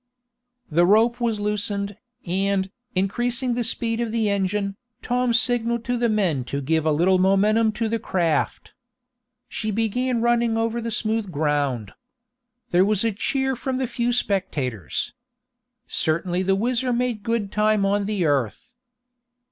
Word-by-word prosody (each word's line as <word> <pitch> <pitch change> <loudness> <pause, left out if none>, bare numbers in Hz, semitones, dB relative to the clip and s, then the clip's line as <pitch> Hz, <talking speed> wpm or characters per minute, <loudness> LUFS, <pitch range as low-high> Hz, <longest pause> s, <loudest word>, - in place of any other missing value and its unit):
The 170 +3 +4
rope 230 +4 +4
was 230 -3 0
loosened, 205 -1 -2 0.3
and, 195 +1 0 0.2
increasing 240 +6 0
the 240 0 -1
speed 230 0 -1
of 230 -2 -2
the 220 -2 +1
engine, 200 0 -1 0.3
Tom 250 0 +1
signalled 235 -1 +1
to 245 - 0
the 240 -1 +1
men 185 - +1
to 140 +3 -3
give 160 +3 0
a - - +4
little 180 +5 +3
momentum 210 +4 +3
to 225 0 -1
the 230 +1 -1
craft. 170 -7 -1 0.7
She 215 - -3
began 230 +4 0
running 235 -1 +2
over 230 +1 -1
the 230 - -3
smooth 220 -2 -1
ground. 145 - -1 0.8
There 180 +1 +5
was 210 +1 +1
a 225 - +2
cheer 265 +6 -1
from 260 +1 -3
the 260 - 0
few 240 0 -1
spectators. 155 - -1 0.7
Certainly 175 +3 0
the 190 +1 +2
WHIZZER 245 +4 0
made 240 -2 -1
good 220 -2 -1
time 210 -1 +2
on 200 +1 +1
the 200 -4 -1
earth. 140 - -1
210 Hz, 150 wpm, -23 LUFS, 185-235 Hz, 0.8 s, There